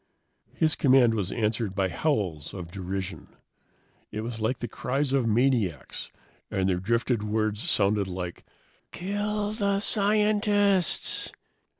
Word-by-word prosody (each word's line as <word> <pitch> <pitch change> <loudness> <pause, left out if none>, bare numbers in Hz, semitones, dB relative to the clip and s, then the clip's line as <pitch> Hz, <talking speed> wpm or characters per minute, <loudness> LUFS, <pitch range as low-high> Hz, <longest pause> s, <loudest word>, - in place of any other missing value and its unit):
His 155 -1 +3
command 130 -4 +5
was 100 -3 -2
answered 110 -3 -1
by 95 -1 +1
howls 90 - -1
of 85 -3 -7
derision. 95 -3 -5 0.7
It 110 - -4
was 115 0 -5
like 110 +4 0
the 120 - -4
cries 135 +3 -1
of 130 -4 +2
maniacs, 115 - 0 0.4
and 95 -1 0
their 90 -2 +1
drifted 115 +3 0
words 110 0 -1
sounded 100 -1 +2
like, 90 -1 -5 0.5
"Kill 205 +2 -2
the 200 -2 0
scientists!" 205 -2 +2
115 Hz, 120 wpm, -27 LUFS, 100-165 Hz, 0.7 s, command